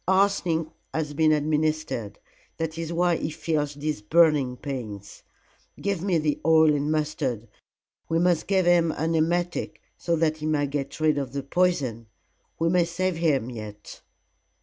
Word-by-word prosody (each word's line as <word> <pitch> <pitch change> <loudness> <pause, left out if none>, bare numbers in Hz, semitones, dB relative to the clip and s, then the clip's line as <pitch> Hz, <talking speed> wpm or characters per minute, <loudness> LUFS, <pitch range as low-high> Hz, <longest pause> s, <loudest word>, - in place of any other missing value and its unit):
Arsenic 190 -4 +2 0.3
has 155 -2 -2
been 155 +1 +3
administered. 155 -6 -1 0.4
That 160 -1 -3
is 165 0 -4
why 175 0 +2
he - - -3
feels 155 -2 -2
these 150 -4 -3
burning 145 0 +3
pains. 110 -9 -7 0.6
Give 200 -4 -1
me 185 -2 +1
the 150 -2 0
oil 160 -1 +5
and 145 +1 0
mustard. 145 -7 -2 0.6
We 165 - +1
must 175 -1 +2
give 190 -2 +2
him 170 -2 +4
an 160 +2 -1
emetic, 175 +2 0 0.2
so 170 - 0
that 155 -1 +1
he 155 0 -4
may 150 -2 +1
get 140 +1 -4
rid 155 -2 +2
of 135 -2 -5
the 140 -1 -3
poison. 140 -9 0 0.5
We 165 - +1
may 175 0 +3
save 180 +1 -2
him 140 -7 +1
yet." 105 -3 -9
155 Hz, 155 wpm, -25 LUFS, 145-170 Hz, 0.6 s, oil